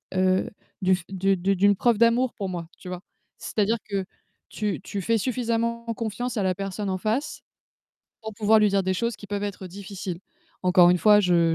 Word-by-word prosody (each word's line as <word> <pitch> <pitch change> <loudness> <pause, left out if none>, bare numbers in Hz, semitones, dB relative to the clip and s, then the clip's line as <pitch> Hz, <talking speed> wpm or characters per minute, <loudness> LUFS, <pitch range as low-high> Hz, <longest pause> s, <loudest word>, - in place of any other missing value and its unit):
heu, 185 0 +2 0.3
du 185 0 +4
f 180 - -8
du 195 0 +1
du 195 +2 +1
d'une 200 +2 +4
preuve 235 +1 +2
d'amour 235 +2 +3
pour 195 -3 -4
moi, 170 -2 -5
tu 185 - -12
vois? 180 0 -5 0.4
C'est-à-dire 220 +2 0
que 195 -2 -1 0.4
tu 210 -3 -2
tu 200 0 -5
fais 230 +4 +1
suffisamment 235 0 -1
confiance 235 +2 -3
à 205 - +1
la 185 -1 +1
personne 195 +1 -4
en 185 - -1
face 225 +9 -2 0.8
pour 220 -1 -7
pouvoir 220 +1 +4
lui 210 - +5
dire 200 -1 +1
des 185 0 0
choses 235 +4 -1
qui 205 - -11
peuvent 205 0 -3
être 200 -2 -5
difficiles. 190 -1 -7 0.4
Encore 180 -1 +6
une 180 - +3
fois, 210 +2 +6
je 175 -3 +3
200 Hz, 200 wpm, -25 LUFS, 185-225 Hz, 0.8 s, Encore